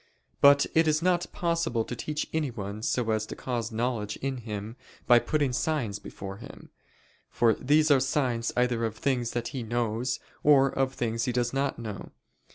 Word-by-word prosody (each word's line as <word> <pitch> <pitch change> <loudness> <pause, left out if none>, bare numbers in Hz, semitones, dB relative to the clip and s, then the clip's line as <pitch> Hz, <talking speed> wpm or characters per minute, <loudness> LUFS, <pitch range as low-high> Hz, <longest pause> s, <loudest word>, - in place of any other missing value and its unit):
But 140 0 +7
it 160 0 +4
is 155 +1 +2
not 175 -1 +1
possible 165 -10 0
to 125 - -5
teach 150 +5 -3
anyone 110 -9 -3
so 115 0 0
as 110 0 -1
to - - -6
cause 120 -3 -3
knowledge 110 -2 -2
in 135 -1 -3
him, 110 -1 -6 0.3
by 120 -1 +7
putting 145 -1 0
signs 125 -8 -1
before 95 -1 -8
him. 115 - -12 0.6
For 115 -1 +3
these 150 +5 +3
are 140 - +6
signs 130 -3 0
either 125 -2 +1
of 110 -1 -2
things 125 -2 -1
that 120 -1 -2
he 130 -2 -5
knows, 120 +1 -1 0.2
or 135 -2 +5
of 135 0 -1
things 115 -1 -1
he 125 - 0
does 120 0 -1
not 135 0 0
know. 110 -4 -7
125 Hz, 175 wpm, -28 LUFS, 115-140 Hz, 0.6 s, But